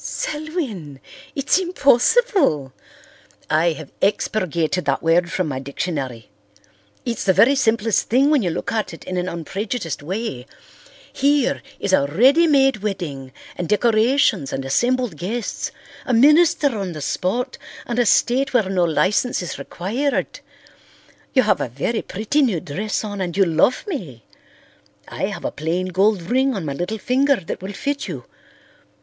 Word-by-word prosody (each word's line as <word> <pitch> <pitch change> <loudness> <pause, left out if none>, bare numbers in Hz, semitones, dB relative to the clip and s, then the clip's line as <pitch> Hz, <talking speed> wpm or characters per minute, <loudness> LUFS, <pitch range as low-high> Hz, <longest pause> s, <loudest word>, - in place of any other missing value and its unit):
"Selwyn! 290 - -4 0.4
It's 280 +6 +2
impossible." 345 - +2 0.8
"I 160 +2 +3
have 155 -2 -10
expurgated 180 -4 0
that 140 -1 0
word 170 +1 +2
from 185 - -1
my 135 -3 -3
dictionary. 135 -4 -5 0.7
It's 235 -1 -2
the 190 - +3
very 250 +9 +5
simplest 225 -5 +1
thing 270 +5 +4
when 295 -4 +4
you 180 - 0
look 160 - -3
at 220 -6 -2
it - - -14
in 185 - -5
an 180 +1 -1
unprejudiced 170 - -4
way. 165 - -4 0.7
Here 280 0 +2 0.2
is 200 -1 -1
a 140 -6 +4
ready 265 - +4
made 270 -4 +4
wedding 170 -11 -5 0.2
and 175 - -4
decorations 215 - +2
and 135 - -4
assembled 240 - 0
guests, 210 +8 -3 0.4
a 250 - +2
minister 295 0 +5
on 195 -4 -3
the 155 - -7
spot 245 - -2 0.3
and 240 0 -2
a 245 - +3
state 255 +5 +2
where 215 -6 +3
no 180 -2 +2
licence 185 - +1
is 165 - -6
required. 220 - -2 1.0
You 260 - +5
have - - +2
a - - -2
very 145 - -2
pretty 220 +10 -1
new 225 - +2
dress 195 +11 -3
on 205 -2 -5
and 175 -1 -3
you 195 - +5
love 170 +9 +2
me. 170 - -6 0.8
I - - -3
have - - -6
a - - -1
plain 170 +5 -2
gold 195 +1 +2
ring 260 +7 +1
on 190 -5 -4
my 140 - -3
little 180 +9 -3
finger 275 +5 +2
that 190 -5 -6
will 195 +2 -6
fit 285 +7 -3
you. 145 -9 -6
200 Hz, 155 wpm, -21 LUFS, 165-255 Hz, 1.0 s, very